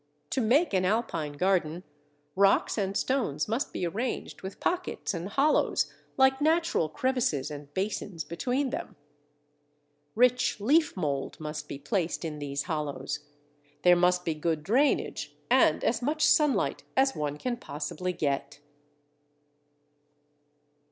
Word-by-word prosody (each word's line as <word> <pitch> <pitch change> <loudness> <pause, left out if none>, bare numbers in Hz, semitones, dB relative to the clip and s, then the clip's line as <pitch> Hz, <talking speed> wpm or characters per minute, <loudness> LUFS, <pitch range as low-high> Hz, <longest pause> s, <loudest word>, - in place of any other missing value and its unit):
To 265 - +1
make 260 - +3
an 185 -1 +2
Alpine 185 -7 -1
garden, 175 0 0 0.5
rocks 195 +1 +3
and 200 -2 -1
stones 215 - 0
must 230 +6 -1
be - - -2
arranged 225 +9 -3
with 190 +1 -7
pockets 355 - -2
and 175 +2 -4
hollows, 280 +8 +2 0.2
like 265 +1 +4
natural 320 - +2
crevices 235 - 0
and 145 -1 -8
basins, 190 -3 -3
between 255 +9 -1
them. - - -5 1.2
Rich 250 -1 +3
leaf 290 +5 +3
mould 140 -5 -2
must 155 0 -5
be - - -6
placed 165 +4 -2
in 150 -2 -5
these 140 0 -3
hollows. 145 -3 -3 0.6
There 180 0 +7
must 180 0 +2
be 165 - 0
good 155 0 -1
drainage, 255 - +1 0.2
and - - +4
as - - +1
much 300 +4 +1
sunlight 285 -9 +3
as 270 0 +3
one 150 -1 -2
can 245 +8 -2
possibly 150 +4 -4
get. 145 -5 -2
185 Hz, 130 wpm, -28 LUFS, 155-250 Hz, 1.2 s, There